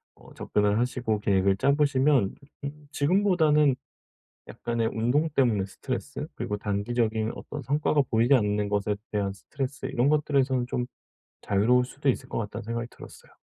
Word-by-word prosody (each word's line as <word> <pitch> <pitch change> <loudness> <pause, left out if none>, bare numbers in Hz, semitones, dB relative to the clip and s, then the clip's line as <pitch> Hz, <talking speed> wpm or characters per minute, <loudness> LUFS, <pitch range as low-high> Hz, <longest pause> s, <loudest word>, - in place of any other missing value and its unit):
어 - - -17
접근을 105 0 +1
하시고 120 -3 0
계획을 95 -1 +3
짜 140 +7 +3
보시면 140 -6 +2 0.3
음 145 +1 -8
지금보다는 150 -3 +3 0.7
약간의 115 -1 -2
운동 125 +8 +1
때문에 120 -9 +2
스트레스 95 - -5
그리고 105 - -3
단기적인 110 +2 -1
어떤 150 - -7
성과가 145 +3 +2
보이지 115 +4 +4
않는 105 -2 +1
것에 105 0 0 0.2
대한 100 -2 0
스트레스 135 +6 -5
이런 125 +4 +1
것들에서는 135 -4 +2
좀 125 0 -2 0.6
자유로울 120 +5 +3
수도 140 +3 -4
있을 - - -4
것 - - -2
같다는 105 -2 -4
생각이 115 +1 -3
들었어요. - - -14
120 Hz, 375 characters per minute, -27 LUFS, 105-140 Hz, 0.7 s, 보이지